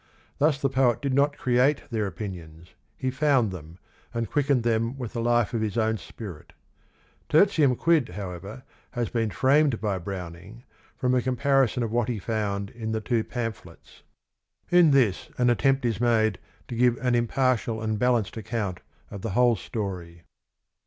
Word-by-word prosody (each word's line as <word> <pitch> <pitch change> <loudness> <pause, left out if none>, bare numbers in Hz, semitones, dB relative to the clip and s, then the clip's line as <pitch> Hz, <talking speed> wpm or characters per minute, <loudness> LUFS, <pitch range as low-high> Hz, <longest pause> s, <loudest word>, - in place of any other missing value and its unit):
Thus 150 -1 +3
the 140 - +1
poet 130 -3 +2
did 140 -2 -2
not 140 +2 +2
create 130 +3 +2
their 110 -3 -1
opinions; 85 -3 -8 0.2
he 130 - -2
found 130 -5 +2
them, 85 -2 -10 0.4
and 115 -2 -2
quickened 140 -4 +2
them 115 +2 0
with 120 -4 -6
the 115 - -2
life 120 -1 +2
of 115 - 0
his 110 -2 -2
own 110 0 +1
spirit. 85 -7 -10 0.8
Tertium 155 -6 +4
Quid, 160 - +2
however, 95 +5 -7 0.3
has 120 -3 -2
been 115 -2 -1
framed 135 - +3
by 100 -4 -1
Browning 95 +4 -8 0.3
from 125 0 +1
a 125 - +3
comparison 130 -1 +1
of 115 - -3
what 120 0 0
~he~fo~uiid~in 110 0 -3
t 110 - 0
he^two^pamphle 115 0 -3
t - - -35
s. - - -20 0.7
In 175 -2 +6
this 130 -9 +2
an 125 -1 +3
atte 120 - 0
mpt 135 -1 +1
is 115 -1 -1
made 110 -4 +2 0.3
to 120 - -5
g 125 +2 +4
ive 120 -1 +1
an 125 -1 0
impartial 120 -1 +1
And 110 -1 -2
balanc£d_ai^ountjQLthe 110 -4 -1 0.3
VFh©leHstery. 100 -5 -1
115 Hz, 155 wpm, -26 LUFS, 105-130 Hz, 0.8 s, In